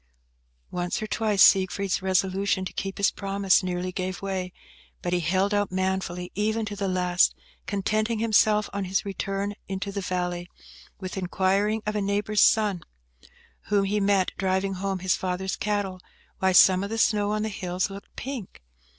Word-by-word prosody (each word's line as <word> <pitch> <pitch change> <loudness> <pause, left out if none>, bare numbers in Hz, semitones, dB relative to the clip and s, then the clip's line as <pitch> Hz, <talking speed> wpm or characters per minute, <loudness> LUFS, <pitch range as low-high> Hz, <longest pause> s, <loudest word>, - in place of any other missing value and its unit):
Once 175 0 -2
or 215 - -3
twice 215 -2 +2
Siegfried's 195 0 +3
resolution 190 +1 +1
to - - -6
keep 195 -1 -4
his 200 - +3
promise 195 -1 +2
nearly 180 0 -3
gave 185 0 -3
way, 190 -2 -3 0.5
but 175 - -1
he 180 - +2
held 185 +4 +1
out 205 -2 +1
manfully 185 -1 -2
even 220 +2 0
to 205 -1 -5
the 200 -1 -2
last, 180 -1 +2 0.3
contenting 215 +4 0
himself, 215 -1 +3
on 200 -1 -2
his 190 +2 -1
return 195 +1 -3
into 195 +1 -4
the 200 0 -3
valley, 180 -1 -3 0.5
with 190 0 -6
inquiring 195 +4 +1
of 210 0 -2
a 210 - 0
neighbour's 205 +1 +1
son, 205 -5 +4 0.8
whom 205 -1 +2
he 205 +2 0
met 195 -2 +2
driving 190 0 0
home 195 +1 -2
his 185 0 +1
father's 185 +1 -2
cattle, 205 -3 -2 0.4
why 190 0 +3
some 185 +1 +6
of 200 - -4
the 225 - -3
snow 210 -2 +2
on 215 0 0
the 220 - -1
hills 185 -1 -2
looked 200 0 -10
pink? 245 - -7
195 Hz, 165 wpm, -26 LUFS, 185-205 Hz, 0.8 s, some